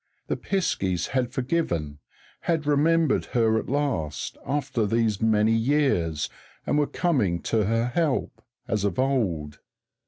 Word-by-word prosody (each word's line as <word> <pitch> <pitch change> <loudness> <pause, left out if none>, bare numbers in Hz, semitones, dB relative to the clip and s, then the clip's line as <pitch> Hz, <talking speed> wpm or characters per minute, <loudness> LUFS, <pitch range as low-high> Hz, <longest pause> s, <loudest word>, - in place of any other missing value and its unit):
_ - - -46
The - - +1
piskies 95 - -1
had 125 -2 0
forgiven, 125 - -1 0.4
had 160 -3 -1
remembered 155 +1 +3
her 110 -1 +3
at - - -7
last, 130 - -1
after 135 -5 0
these 110 -2 +1
many 110 0 +3
years, 115 - +1 0.4
and 150 - +1
were 145 - +2
coming 125 - +1
to 110 -3 +1
her 115 +3 +1
help, 140 +2 -1 0.3
as 105 -2 -1
of 100 - -1
old. 100 - 0
115 Hz, 135 wpm, -25 LUFS, 100-145 Hz, 0.4 s, remembered